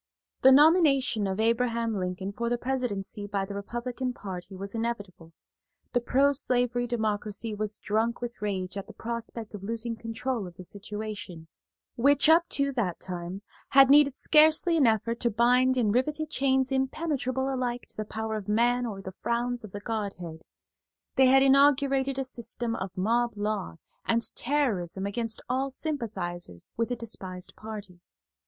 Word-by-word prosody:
The 265 Hz, -, +8 dB
nomination 285 Hz, -, +5 dB
of 190 Hz, +1 st, -3 dB
Abraham 230 Hz, 0 st, +1 dB
Lincoln 185 Hz, 0 st, -3 dB
for 235 Hz, +2 st, -2 dB
the 240 Hz, -, 0 dB
presidency 235 Hz, -6 st, -3 dB
by 200 Hz, -1 st, -1 dB
the 200 Hz, -, -7 dB
Republican 240 Hz, +5 st, -4 dB
party 190 Hz, -3 st, -8 dB
was 195 Hz, +1 st, -6 dB
inevitable. 205 Hz, -8 st, -4 dB, 0.6 s
The 245 Hz, -, +2 dB
proslavery 250 Hz, -2 st, +2 dB
Democracy 215 Hz, -1 st, -2 dB
was 210 Hz, 0 st, -3 dB
drunk 225 Hz, +3 st, -1 dB
with 240 Hz, -2 st, -6 dB
rage 195 Hz, -2 st, -3 dB
at 195 Hz, -, -6 dB
the -, -, -12 dB
prospect 230 Hz, -1 st, -6 dB
of 205 Hz, -, -7 dB
losing 230 Hz, +3 st, -3 dB
control 230 Hz, -1 st, -3 dB
of 175 Hz, -, -12 dB
the 185 Hz, -, -10 dB
situation, 205 Hz, -4 st, -7 dB, 0.5 s
which, 280 Hz, +4 st, +4 dB
up 335 Hz, +2 st, +6 dB
to 280 Hz, 0 st, +2 dB
that 215 Hz, -10 st, -2 dB
time, 180 Hz, +1 st, -6 dB, 0.3 s
had 270 Hz, -1 st, +8 dB
needed 285 Hz, -2 st, +6 dB
scarcely 315 Hz, +4 st, +5 dB
an 290 Hz, -6 st, +4 dB
effort 230 Hz, +1 st, +1 dB
to 235 Hz, -, +2 dB
bind 250 Hz, +3 st, +3 dB
in 220 Hz, -4 st, +2 dB
riveted 300 Hz, +6 st, 0 dB
chains 265 Hz, -1 st, +2 dB
impenetrable 265 Hz, -1 st, -1 dB
alike 245 Hz, -2 st, -2 dB
to -, -, -12 dB
the 215 Hz, -, -3 dB
power 220 Hz, +1 st, -4 dB
of 205 Hz, -, -7 dB
man 240 Hz, +3 st, +2 dB
or 195 Hz, -3 st, -6 dB
the 190 Hz, -, -7 dB
frowns 240 Hz, 0 st, -1 dB
of 215 Hz, -, -9 dB
the 205 Hz, -, -7 dB
Godhead; 200 Hz, -8 st, -4 dB, 0.7 s
they 265 Hz, -2 st, +6 dB
had 270 Hz, +1 st, +6 dB
inaugurated 275 Hz, -1 st, +4 dB
a 270 Hz, -, 0 dB
system 235 Hz, -2 st, -3 dB
of 190 Hz, -, -4 dB
mob 235 Hz, +3 st, +1 dB
law 205 Hz, -, -2 dB, 0.3 s
and 230 Hz, 0 st, +1 dB
terrorism 210 Hz, -, -1 dB
against 220 Hz, +2 st, -2 dB
all 265 Hz, +2 st, 0 dB
sympathizers 200 Hz, -, -4 dB
with 230 Hz, +1 st, -1 dB
the 245 Hz, -, -1 dB
despised 190 Hz, -6 st, -6 dB
party. 210 Hz, -5 st, -9 dB
230 Hz, 160 wpm, -28 LUFS, 205-260 Hz, 0.7 s, The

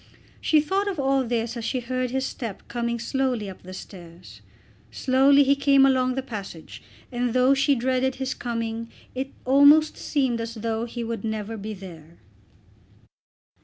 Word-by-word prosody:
She 310 Hz, -, +4 dB
thought 385 Hz, +7 st, -1 dB
of 380 Hz, -6 st, -3 dB
all 270 Hz, 0 st, +2 dB
this 235 Hz, 0 st, -2 dB
as 235 Hz, -, -5 dB
she 255 Hz, +3 st, -1 dB
heard 255 Hz, +1 st, -2 dB
his 265 Hz, +2 st, -1 dB
step 230 Hz, -7 st, -6 dB
coming 235 Hz, 0 st, -2 dB
slowly 245 Hz, -2 st, -1 dB
up 190 Hz, -, -9 dB
the 185 Hz, -, -11 dB
stairs. 175 Hz, -2 st, -11 dB, 0.5 s
Slowly 275 Hz, +2 st, +4 dB
he 280 Hz, +1 st, +3 dB
came 275 Hz, -1 st, +5 dB
along 255 Hz, -1 st, +2 dB
the 265 Hz, -, -2 dB
passage, 200 Hz, -9 st, -8 dB, 0.3 s
and 245 Hz, -1 st, -1 dB
though 255 Hz, +2 st, +5 dB
she 275 Hz, +1 st, +3 dB
dreaded 255 Hz, +1 st, 0 dB
his 265 Hz, 0 st, -3 dB
coming 230 Hz, -1 st, -4 dB, 0.2 s
it 265 Hz, +1 st, -3 dB, 0.2 s
almost 285 Hz, +4 st, +6 dB
seemed 260 Hz, -6 st, 0 dB
as 230 Hz, +1 st, -5 dB
though 225 Hz, +1 st, -2 dB
he 240 Hz, 0 st, -5 dB
would 230 Hz, -3 st, -4 dB
never 220 Hz, 0 st, -3 dB
be 215 Hz, 0 st, -6 dB
there. 170 Hz, -4 st, -12 dB
245 Hz, 165 wpm, -25 LUFS, 225-270 Hz, 0.5 s, almost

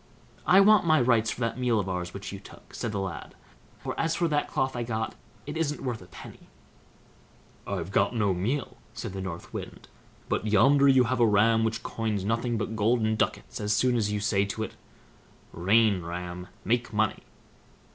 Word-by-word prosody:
"I 190 Hz, +2 st, +7 dB
want 210 Hz, 0 st, +6 dB
my 155 Hz, -1 st, +5 dB
rights 120 Hz, -3 st, +3 dB
for 125 Hz, -, -5 dB
that 115 Hz, +1 st, -1 dB
meal 120 Hz, -3 st, +2 dB
of 100 Hz, -, -2 dB
ours 90 Hz, -1 st, -3 dB
which 100 Hz, +1 st, -7 dB
you 100 Hz, -, -7 dB
took", -, -, -16 dB
said 115 Hz, -, -3 dB
the 100 Hz, -, -2 dB
lad; 95 Hz, -1 st, -6 dB, 0.4 s
"for, -, -, -5 dB
as 165 Hz, 0 st, +1 dB
for 170 Hz, -, +1 dB
that 145 Hz, -1 st, 0 dB
cloth 130 Hz, -1 st, -1 dB
I 120 Hz, -, -2 dB
got, 110 Hz, -1 st, -2 dB, 0.3 s
it 150 Hz, -, -6 dB
isn't 155 Hz, -3 st, -2 dB
worth 120 Hz, -5 st, -3 dB
a 90 Hz, -, -13 dB
penny." -, -, -13 dB, 1.2 s
"I've 95 Hz, -2 st, -3 dB
got 100 Hz, +4 st, +2 dB
no 105 Hz, -4 st, +2 dB
meal", 120 Hz, +10 st, -2 dB, 0.2 s
said -, -, -5 dB
the 95 Hz, -, -5 dB
North 90 Hz, -3 st, -7 dB
Wind; -, -, -8 dB, 0.4 s
"but 110 Hz, -, -1 dB
yonder 135 Hz, +7 st, +5 dB
you 130 Hz, -2 st, +6 dB
have 125 Hz, +1 st, -1 dB
a 120 Hz, -, +5 dB
ram 110 Hz, +2 st, +4 dB
which 115 Hz, 0 st, -1 dB
coins 110 Hz, -4 st, -2 dB
nothing 115 Hz, +2 st, 0 dB
but 110 Hz, +1 st, -3 dB
golden 110 Hz, 0 st, +2 dB
ducats 115 Hz, +2 st, -2 dB
as 105 Hz, 0 st, +1 dB
soon 125 Hz, +4 st, +2 dB
as 105 Hz, -3 st, 0 dB
you 105 Hz, -, -1 dB
say 100 Hz, -2 st, +1 dB
to 100 Hz, +2 st, -3 dB
it: -, -, -5 dB, 0.8 s
'Rain, 100 Hz, +2 st, +3 dB
ram! 90 Hz, +1 st, -6 dB, 0.2 s
make 120 Hz, +2 st, 0 dB
money! 110 Hz, -1 st, 0 dB
110 Hz, 195 wpm, -27 LUFS, 100-125 Hz, 1.2 s, I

